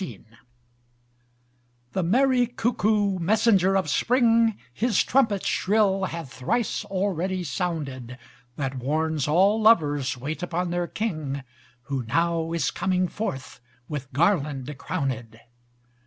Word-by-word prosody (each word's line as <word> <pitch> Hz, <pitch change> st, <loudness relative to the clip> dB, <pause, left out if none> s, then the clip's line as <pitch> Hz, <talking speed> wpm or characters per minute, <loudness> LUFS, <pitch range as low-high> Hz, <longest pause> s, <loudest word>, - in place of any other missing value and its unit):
XIX 120 Hz, -, -7 dB, 1.7 s
The 190 Hz, -, -1 dB
merry 245 Hz, +7 st, +3 dB
cuckoo, 215 Hz, -5 st, 0 dB
messenger 195 Hz, 0 st, +3 dB
of 190 Hz, -, 0 dB
spring, 230 Hz, -, +3 dB, 0.2 s
His 225 Hz, -, +2 dB
trumpet 225 Hz, -7 st, +1 dB
shrill 195 Hz, -1 st, +2 dB
hath 165 Hz, -8 st, -6 dB
thrice 225 Hz, -, -1 dB
already 185 Hz, -1 st, -1 dB
sounded: 140 Hz, -8 st, -4 dB, 0.4 s
That 135 Hz, -2 st, -3 dB
warns 155 Hz, +2 st, -1 dB
all 195 Hz, +8 st, +3 dB
lovers 145 Hz, -, +3 dB
wait 145 Hz, +4 st, -5 dB
upon 180 Hz, 0 st, -2 dB
their 175 Hz, 0 st, -1 dB
king, 155 Hz, -12 st, -3 dB, 0.4 s
Who 135 Hz, 0 st, -3 dB
now 165 Hz, +7 st, 0 dB
is 165 Hz, -4 st, 0 dB
coming 185 Hz, -1 st, 0 dB
forth 135 Hz, -12 st, -5 dB, 0.3 s
with 140 Hz, -3 st, -6 dB
garland 150 Hz, -3 st, 0 dB
crowned. 120 Hz, -6 st, -4 dB
175 Hz, 110 wpm, -25 LUFS, 140-205 Hz, 1.7 s, merry